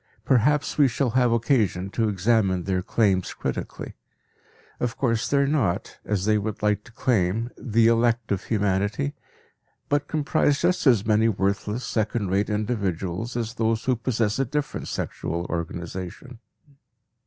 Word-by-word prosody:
Perhaps 140 Hz, +5 st, +2 dB
we 145 Hz, -, +7 dB
shall 125 Hz, 0 st, 0 dB
have 125 Hz, 0 st, +3 dB
occasion 110 Hz, -, +1 dB
to 110 Hz, 0 st, +1 dB
examine 100 Hz, -2 st, +1 dB
their 95 Hz, -1 st, 0 dB
claims 95 Hz, -2 st, +1 dB
critically. -, -, -5 dB, 0.9 s
Of 120 Hz, -1 st, -2 dB
course 115 Hz, -2 st, 0 dB
they 140 Hz, -, +2 dB
are 140 Hz, -, +4 dB
not, 135 Hz, -, -1 dB
as 100 Hz, -3 st, -1 dB
they 105 Hz, 0 st, +3 dB
would 105 Hz, 0 st, -4 dB
like 105 Hz, 0 st, +1 dB
to -, -, -15 dB
claim, 115 Hz, -2 st, 0 dB
the 115 Hz, -1 st, +1 dB
"elect" 115 Hz, 0 st, +2 dB
of 100 Hz, -1 st, -1 dB
humanity, 100 Hz, -6 st, 0 dB, 0.8 s
but 145 Hz, 0 st, +1 dB
comprise 145 Hz, -1 st, +1 dB
just 175 Hz, -3 st, +2 dB
as 115 Hz, -5 st, +4 dB
many 110 Hz, +1 st, +3 dB
worthless 100 Hz, +3 st, -1 dB
second 110 Hz, -3 st, -1 dB
rate 100 Hz, +2 st, +1 dB
individuals 105 Hz, 0 st, -2 dB
as 115 Hz, -1 st, -3 dB
those 115 Hz, -2 st, 0 dB
who 130 Hz, -, +2 dB
possess 115 Hz, -1 st, -1 dB
a 135 Hz, -, +2 dB
different 145 Hz, +3 st, -3 dB
sexual 85 Hz, +1 st, -3 dB
organization. 90 Hz, -, -5 dB
110 Hz, 145 wpm, -25 LUFS, 100-120 Hz, 0.9 s, we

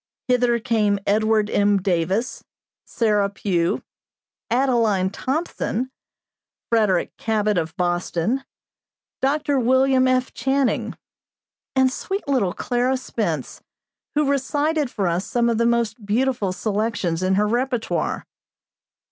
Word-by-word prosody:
Hither 245 Hz, -1 st, +3 dB
came 220 Hz, -3 st, +1 dB
Edward 215 Hz, +1 st, +2 dB
M. 205 Hz, 0 st, +3 dB
Davis, 190 Hz, +5 st, -1 dB, 0.4 s
Sarah 210 Hz, -3 st, +1 dB
Pugh, 180 Hz, -4 st, -1 dB, 0.7 s
Adeline 230 Hz, -7 st, +2 dB
Thompson, 260 Hz, -1 st, -2 dB, 0.8 s
Frederick 210 Hz, -6 st, +2 dB
Cabot 215 Hz, -2 st, 0 dB
of 165 Hz, +1 st, -2 dB
Boston, 175 Hz, +7 st, 0 dB, 0.8 s
Dr. 285 Hz, 0 st, +1 dB
William 260 Hz, +1 st, +3 dB
F. 255 Hz, 0 st, +1 dB
Channing, 270 Hz, -1 st, 0 dB, 0.8 s
and 260 Hz, -1 st, +4 dB
sweet 385 Hz, +5 st, -4 dB
little 240 Hz, -11 st, +1 dB
Clara 250 Hz, +1 st, 0 dB
Spence, 260 Hz, -, -3 dB, 0.5 s
who 300 Hz, -1 st, +2 dB
recited 290 Hz, +2 st, 0 dB
for 205 Hz, -5 st, -2 dB
us 175 Hz, +2 st, 0 dB
some 235 Hz, -1 st, +1 dB
of 230 Hz, -, 0 dB
the 235 Hz, -, +3 dB
most 235 Hz, -2 st, 0 dB
beautiful 220 Hz, -1 st, 0 dB
selections 200 Hz, -4 st, -1 dB
in 185 Hz, +1 st, +2 dB
her 210 Hz, +2 st, +3 dB
repertoire. 245 Hz, +1 st, -1 dB
230 Hz, 110 wpm, -22 LUFS, 200-260 Hz, 0.8 s, and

